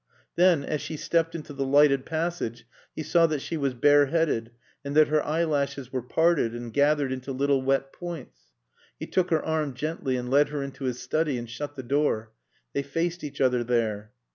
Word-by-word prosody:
Then, 175 Hz, -4 st, +4 dB
as 150 Hz, -, -2 dB
she 155 Hz, -, -5 dB
stepped 165 Hz, +2 st, 0 dB
into 155 Hz, -2 st, -7 dB
the 140 Hz, 0 st, -2 dB
lighted 140 Hz, 0 st, +4 dB
passage, 160 Hz, -8 st, -3 dB, 0.3 s
he 155 Hz, -, -4 dB
saw 165 Hz, +2 st, +4 dB
that 155 Hz, -1 st, -1 dB
she 165 Hz, -, -5 dB
was 140 Hz, -4 st, -1 dB
bareheaded 145 Hz, -2 st, +3 dB, 0.3 s
and 140 Hz, 0 st, -4 dB
that 155 Hz, -1 st, +6 dB
her 150 Hz, 0 st, +2 dB
eyelashes 145 Hz, -4 st, -1 dB
were 130 Hz, -, -1 dB
parted 155 Hz, -2 st, +1 dB
and 120 Hz, -1 st, -7 dB
gathered 145 Hz, -1 st, +2 dB
into 130 Hz, +1 st, -4 dB
little 140 Hz, +1 st, +1 dB
wet 135 Hz, +1 st, 0 dB
points. 170 Hz, -6 st, -8 dB, 0.5 s
He -, -, -4 dB
took 185 Hz, -1 st, 0 dB
her 160 Hz, -2 st, +1 dB
arm 155 Hz, -4 st, -1 dB
gently 145 Hz, -1 st, -2 dB
and 125 Hz, 0 st, -4 dB
led 145 Hz, +2 st, +4 dB
her 145 Hz, -1 st, -3 dB
into 135 Hz, 0 st, -6 dB
his 125 Hz, -1 st, -2 dB
study 155 Hz, -4 st, 0 dB
and 120 Hz, 0 st, -6 dB
shut 145 Hz, +5 st, -6 dB
the 130 Hz, -, -6 dB
door. 120 Hz, -4 st, 0 dB, 0.4 s
They 140 Hz, -, 0 dB
faced 165 Hz, +5 st, -2 dB
each 145 Hz, -, -7 dB
other 125 Hz, -2 st, +2 dB
there. 110 Hz, -3 st, -1 dB
145 Hz, 190 wpm, -26 LUFS, 130-155 Hz, 0.5 s, that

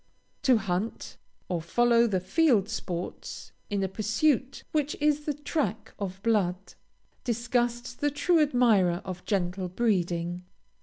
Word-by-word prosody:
To 255 Hz, -3 st, +5 dB
hunt, 200 Hz, +1 st, -3 dB, 0.3 s
or 175 Hz, -3 st, -1 dB
follow 235 Hz, +7 st, +3 dB
the 195 Hz, -4 st, +1 dB
field 215 Hz, -, +3 dB
sports, 180 Hz, -5 st, -5 dB, 0.2 s
in 200 Hz, -2 st, 0 dB
a -, -, +1 dB
pursuit 240 Hz, +7 st, 0 dB
which 300 Hz, -1 st, 0 dB
is 300 Hz, 0 st, +2 dB
the 295 Hz, -, 0 dB
track 280 Hz, -7 st, -2 dB
of 190 Hz, -2 st, -4 dB
blood, 195 Hz, -4 st, 0 dB, 0.5 s
disgusts 240 Hz, 0 st, -1 dB
the 290 Hz, +4 st, 0 dB
true 325 Hz, +4 st, +2 dB
admirer 220 Hz, -, +3 dB
of 185 Hz, -2 st, -6 dB
gentle 185 Hz, -2 st, -1 dB
breeding. 175 Hz, -4 st, 0 dB
220 Hz, 125 wpm, -28 LUFS, 185-255 Hz, 0.5 s, To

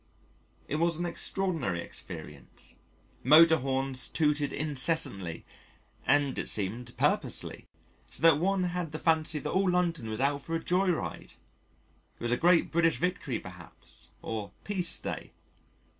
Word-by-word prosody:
It 150 Hz, -, -2 dB
was 170 Hz, 0 st, +1 dB
an 175 Hz, -, -2 dB
extraordinary 170 Hz, -, -1 dB
experience: -, -, -9 dB, 0.5 s
motor 160 Hz, +4 st, +7 dB
horns 135 Hz, 0 st, +2 dB
tooted 150 Hz, -3 st, +1 dB
incessantly 140 Hz, -, 0 dB, 0.6 s
and 140 Hz, -1 st, +2 dB
it -, -, -2 dB
seemed 115 Hz, +4 st, -2 dB
purposelessly, -, -, -1 dB, 0.4 s
so -, -, -6 dB
that 165 Hz, -3 st, +6 dB
one 190 Hz, +2 st, +1 dB
had 175 Hz, -3 st, -3 dB
the -, -, -2 dB
fancy 160 Hz, -1 st, +1 dB
that -, -, -4 dB
all 190 Hz, 0 st, +2 dB
London 170 Hz, -9 st, 0 dB
was 110 Hz, -, -4 dB
out 140 Hz, +1 st, +1 dB
for 165 Hz, +3 st, -4 dB
a 165 Hz, -, -3 dB
joy 185 Hz, +2 st, +1 dB
ride 170 Hz, -, -3 dB, 0.8 s
it -, -, -32 dB
was 120 Hz, -, -2 dB
a -, -, +4 dB
great 170 Hz, +4 st, +3 dB
British 165 Hz, 0 st, +2 dB
Victory 180 Hz, -, -2 dB
perhaps, 90 Hz, -4 st, -10 dB
or 110 Hz, -3 st, -5 dB
Peace 180 Hz, -5 st, +1 dB
Day. -, -, -6 dB
155 Hz, 145 wpm, -29 LUFS, 130-170 Hz, 0.8 s, motor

